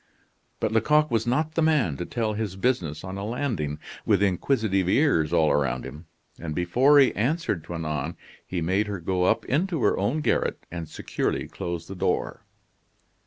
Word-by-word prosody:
But - - 0
Lecoq 150 +8 +3
was 115 0 +1
not 155 +6 0
the 165 - +1
man 150 - +2
to 90 - -5
tell 115 -3 -1
his 105 -3 -3
business 95 - -1
on 95 +1 -5
a - - -4
landing, 105 - -2 0.3
with - - +3
inquisitive 100 -1 +1
ears 95 - +3
all 80 -3 +3
around 65 -3 0
him, 75 +5 -10 0.3
and 80 -3 -5
before 125 +12 +4
he 135 -2 +6
answered 125 - 0
Toinon 80 -2 -3 0.3
he 90 -2 -4
made 95 +6 +1
her 100 -2 -4
go 90 +1 0
up 115 +4 +2
into 165 +1 0
her - - +3
own 120 +11 0
garret, - - 0
and 85 -2 -6
securely - - -2
close 85 -1 -5
the - - -6
door. 95 0 -1
100 Hz, 170 wpm, -26 LUFS, 85-125 Hz, 0.3 s, he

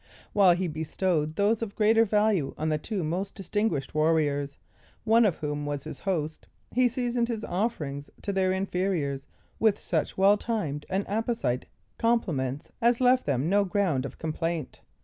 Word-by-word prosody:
While 190 -4 +6
he 180 +1 -1
bestowed 160 0 -1
those 210 +4 +2
of 210 -3 -4
greater 225 +1 +4
value 210 -7 +1
on 155 +1 -1
the 155 -1 0
two 200 +1 -3
most 180 +5 -3
distinguished 195 -7 -1
warriors, 150 -2 +1 0.5
one 230 +1 +5
of 180 - 0
whom 145 -1 -3
was 145 -1 -3
his 155 - -8
host, 160 -5 -3 0.2
he 250 0 +3
seasoned 240 -1 -1
his 225 -2 -3
offerings 150 -9 -2
to 200 - -2
their 190 -1 +2
inferiors 180 -7 -1 0.3
with 220 -2 +3
such 160 -7 -2
well 200 +2 +5
timed 160 -11 -3
and 195 +2 0
apposite 220 - -1 0.3
compliments, 150 - 0
as 235 0 +3
left 255 0 +3
them 140 +1 +1
no 200 +3 +3
ground 180 -8 0
of - - -13
complaint. 160 -1 -3
185 Hz, 160 wpm, -27 LUFS, 150-215 Hz, 0.5 s, While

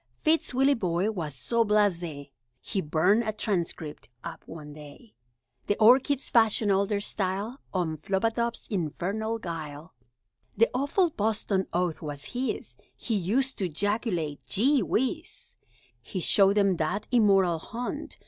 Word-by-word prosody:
Fitz 320 +1 +2
Willieboy 220 -7 +1
was 155 -7 -4
so 230 - +1
blasé, 175 -9 0 0.3
He 195 - -3
burned 180 +8 +3
a 215 - -1
Transcript 175 - -3
up - - -7
one 150 -2 -9
day! 150 +9 -13 0.5
The 205 - +2
Orchids 260 +5 +4
fashioned 220 -2 +3
all 195 +1 +2
their 205 -1 0
style 200 +5 -3
On 175 -4 -1
Flubadub's 225 +8 -1
infernal 200 +5 -2
guile. 160 -4 -7 0.6
That 230 - +4
awful 285 +7 +1
Boston 210 -4 0
oath 175 -2 -1
was 145 - -6
his 255 +2 -3 0.2
He 235 - -3
used 225 +8 0
to 185 -3 -1
'jaculate, 175 - -1
"Gee 255 - +3
Whiz!" 265 - -2 0.5
He 190 - -5
showed 195 +3 +4
them 195 -3 +3
that 180 +6 -2
immoral 195 -8 +4
haunt. 245 - -6
200 Hz, 130 wpm, -27 LUFS, 170-230 Hz, 0.6 s, Orchids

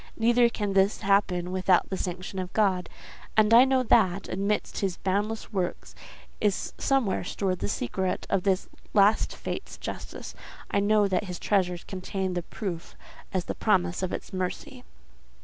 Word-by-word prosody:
Neither 235 +1 +4
can 205 -3 -2
this 195 +1 +3
happen 185 -3 +2
without 185 0 +2
the - - 0
sanction 185 +1 -4
of 185 0 -4
God; 190 -4 +1 0.5
and 215 +1 +5
I 240 +3 +9
know 265 -1 +2
that, 195 -5 +3
amidst 200 +3 -1
His 190 -3 -1
boundless 210 +4 -2
works, 185 -3 -3 0.5
is 205 -2 0
somewhere 265 -11 +1
stored 185 0 -2
the - - -2
secret 185 - -2
of 195 - +1
this 190 0 +1 0.3
last 205 +1 +4
fate's - - -6
justice: - - -7 0.4
I 200 - +2
know 205 0 +3
that 190 +1 0
His 180 -2 -5
treasures 180 -3 0
contain 190 0 -3
the 175 - -1
proof 175 -1 -6 0.4
as 185 -2 -1
the - - -3
promise 180 -5 +1
of 185 - -2
its - - -6
mercy." 190 +7 -4
195 Hz, 160 wpm, -27 LUFS, 185-210 Hz, 0.5 s, I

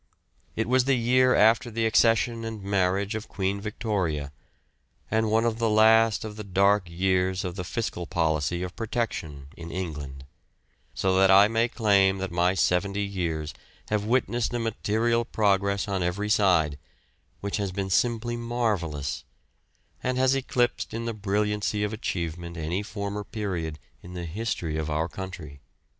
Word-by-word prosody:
It 110 - -1
was 130 +1 +3
the 135 -1 +3
year 125 +2 +4
after 115 +3 +4
the 115 0 -1
accession 115 +1 +3
and 110 -3 -6
marriage 100 +1 0
of 110 0 -5
Queen 100 0 -2
Victoria, 95 - -2 0.8
and 110 0 +2
one 110 +2 +2
of 115 -1 -1
the 115 -1 +2
last 110 0 +4
of 105 -1 -7
the 105 - -5
dark 100 -1 +2
years 95 +1 0
of 90 - -3
the 90 - -4
fiscal 90 -3 -4
policy 80 +1 0
of 90 -1 -6
Protection 95 - -4
in 85 0 -9
England; 75 -6 -6 0.7
so 95 -1 +1
that 95 0 +5
I 100 +2 +8
may 115 +1 +1
claim 100 -5 +3
that 95 -1 -4
my 90 +2 +2
seventy 100 +3 +1
years 85 -6 -3 0.4
have 105 -1 0
witnessed 120 0 0
a - - +1
material 115 +1 0
progress 100 -2 +1
on 95 -2 -1
every 95 +4 -1
side, 85 -9 +3 0.6
which 100 0 -2
has 100 -2 -2
been 95 0 -3
simply 120 +3 +1
marvellous, 105 - -2 0.8
and 130 0 -1
has 130 0 +3
eclipsed 125 -4 0
in 115 0 -3
the 115 - -2
brilliancy 105 0 -1
of 105 +1 -2
achievement 85 -4 -4
any 85 +4 -2
former 105 0 -4
period 90 -8 -4 0.2
in 90 +1 -10
the 90 -1 -4
history 85 -3 -3
of 80 0 -3
our 80 +2 0
country. 80 -5 -8
100 Hz, 155 wpm, -26 LUFS, 90-110 Hz, 0.8 s, I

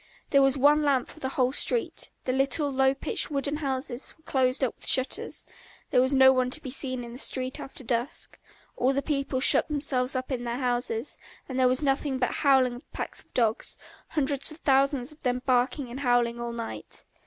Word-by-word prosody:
There 275 - +5
was 270 0 +3
one 290 +3 +5
lamp 275 -4 +1
for - - -7
the 265 - -3
whole 255 -1 +1
street, 460 - +1
the 255 - -1
little, 275 +2 +1
low 265 0 +2
pitched, - - -1
wooden 285 0 -2
houses 265 -3 -3
were 320 - -29
closed 260 -1 +1
up 250 - 0
with - - -13
shutters, 260 0 0 0.5
there 250 - +4
was 260 +2 +2
no 265 0 +7
one 255 -1 +1
to 260 - +1
be 265 -4 -7
seen 255 -2 -1
in 235 0 -9
the 250 - -7
street 255 -1 0
after 270 - -9
dusk, 240 +5 -2 0.4
all 260 +2 +1
the 275 +1 -1
people 275 -3 -1
shut - - +6
themselves 280 -4 0
up 255 +1 -3
in 245 -2 -2
their 240 0 -3
houses, 245 -1 -2 0.3
and 260 -1 -4
there 255 - +5
was 255 +3 +1
nothing 275 -1 0
but 250 -1 0
the - - -5
howling 265 -4 +3
of 245 - -13
packs - - -4
of - - -32
dogs, 225 -2 +1 0.3
hundreds 280 -3 -1
and 310 +1 -8
thousands 275 -1 +2
of 300 - -18
them 250 -1 -1
barking 255 +2 +1
and 245 +3 -7
howling 240 -3 +1
all 235 0 -4
night. 230 -1 -6
265 Hz, 210 wpm, -27 LUFS, 250-280 Hz, 0.5 s, no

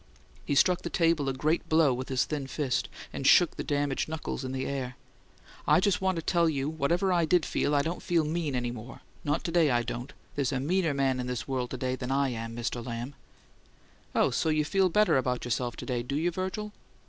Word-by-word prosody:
He 145 - 0
struck 180 +5 +4
the - - -4
table 165 -5 +2
a - - -1
great 155 +5 0
blow 155 -4 +4
with 130 +1 -5
his 130 -1 +1
thin 145 -3 -3
fist, 135 -1 -1 0.2
and 135 - -1
shook 175 -3 +6
the - - -4
damaged 145 0 -1
knuckles 160 -3 -4
in 130 - -4
the 130 0 -2
air. 130 -2 -4 0.7
"I - - +6
just 195 0 +1
want 190 -1 +1
to 165 - -3
tell 170 -1 +3
you, 140 -3 -1
whatever 170 +5 +1
I 170 -2 +3
did 175 0 +3
feel, 145 - 0
I 140 - +3
don't 165 +3 -3
feel 170 -3 +1
MEAN 155 -3 -1
any 120 -1 -1
more; 120 +2 -9 0.2
not 145 - 0
to 170 - -2
day, 165 -3 +4
I 120 -2 +2
don't. 120 +2 -5 0.2
There's 140 -2 0
a 135 - -1
meaner 165 +1 +1
man 135 -2 +1
in 125 - -3
this 125 -2 -3
world 130 -2 -2
than 130 0 -3
I 135 0 +2
am, 115 -1 -5
Mr. 120 0 -3
Lamb!" 120 +3 -5 1.0
"Oh, - - +3
so 160 - 0
you 155 -1 +2
feel 190 +3 +2
better 210 -3 +4
about 125 -2 -1
yourself 120 -1 -1
to - - -7
day, 125 -3 -1
do 125 +4 -4
you, 165 +4 +1
Virgil?" 190 +4 -4
140 Hz, 225 wpm, -29 LUFS, 130-165 Hz, 1.0 s, shook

